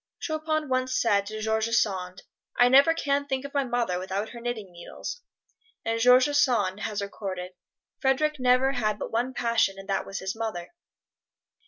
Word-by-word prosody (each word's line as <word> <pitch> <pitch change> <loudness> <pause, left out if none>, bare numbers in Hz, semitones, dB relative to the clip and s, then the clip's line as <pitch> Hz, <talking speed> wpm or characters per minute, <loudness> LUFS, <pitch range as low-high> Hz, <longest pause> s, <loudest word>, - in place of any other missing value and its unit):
Chopin 310 -1 -2
once 255 0 0
said 200 -3 +2
to 215 +1 -5
George 220 0 0
Sand, 185 -5 -1 0.3
"I 245 0 +6
never 280 +5 +6
can 285 -2 0
think 265 0 -2
of 280 - -8
my 280 -1 +2
mother 235 -8 -1
without 190 +3 -3
her 235 -1 -10
knitting 230 -6 -4
needles!" 175 - -8 0.6
And 225 0 0
George 250 +2 +6
Sand 245 -10 +2
has 210 -2 -3
recorded, 185 -2 -5 0.5
"Frederic 290 +2 +1
never 255 +1 +3
had 215 -5 -1
but - - -6
one 245 +3 -1
passion 230 -5 +1
and 195 0 -10
that 195 - -1
was 195 - -5
his 190 +1 -4
mother." 220 -6 -4
235 Hz, 170 wpm, -26 LUFS, 200-265 Hz, 0.6 s, I